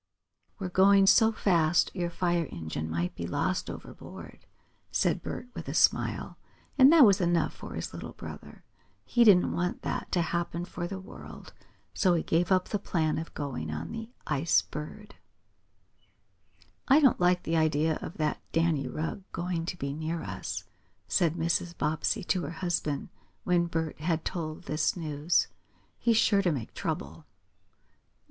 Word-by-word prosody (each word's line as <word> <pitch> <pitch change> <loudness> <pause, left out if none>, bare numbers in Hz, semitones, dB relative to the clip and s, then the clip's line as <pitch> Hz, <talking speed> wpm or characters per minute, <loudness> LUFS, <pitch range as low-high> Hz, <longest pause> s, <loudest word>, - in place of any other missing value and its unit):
"We're 190 -3 -4
going 195 +2 +5
so 220 +3 +6
fast 170 -6 +2
your 175 -2 -2
fire 175 -2 0
engine 80 -1 -5
might 85 +2 -2
be 85 - -5
lost 185 - -1
overboard," - - -10 0.4
said - - +1
Bert 245 - -6
with - - -7
a - - -4
smile, - - +1 0.4
and 270 +1 +8
that 320 -5 +8
was 200 -2 +4
enough 170 -1 +1
for - - -9
his - - -5
little - - -7
brother. - - -10 0.4
He 240 - +4
didn't 195 -5 +6
want 180 +1 -2
that - - -3
to 175 - +3
happen 170 0 -2
for 175 -1 -5
the 190 +1 -5
world, 190 - -11 0.4
so 180 -3 +3
he 165 - 0
gave 170 +3 +1
up 185 -1 +2
the 205 - -1
plan 160 -5 0
of 165 - -8
going 135 - -4
on 75 +1 -5
the 225 0 -6 0.2
Ice 155 +2 +2
Bird. 205 +8 -8 1.7
"I 275 +3 +7
don't 275 -5 +4
like 180 0 +3
the 165 0 0
idea 155 0 +2
of - - -7
that 155 -2 -1
Danny 165 -5 +1
Rugg 160 +8 -4
going 170 -1 -3
to 180 - -4
be 140 -3 -3
near 160 +2 -3
us," - - -5 0.4
said 170 -4 +2
Mrs. 170 +1 -1
Bobbsey 155 +6 0
to 180 +1 0
her - - -4
husband, 165 -4 -2 0.3
when 175 -1 +2
Bert 160 -2 -3
had 160 0 -1
told 160 -2 -4
this 155 +2 0
news. 155 0 +1 0.5
"He's 230 -2 +3
sure 205 -3 +4
to 180 -3 +1
make 130 -7 -4
trouble." - - -5
170 Hz, 160 wpm, -29 LUFS, 155-185 Hz, 1.7 s, and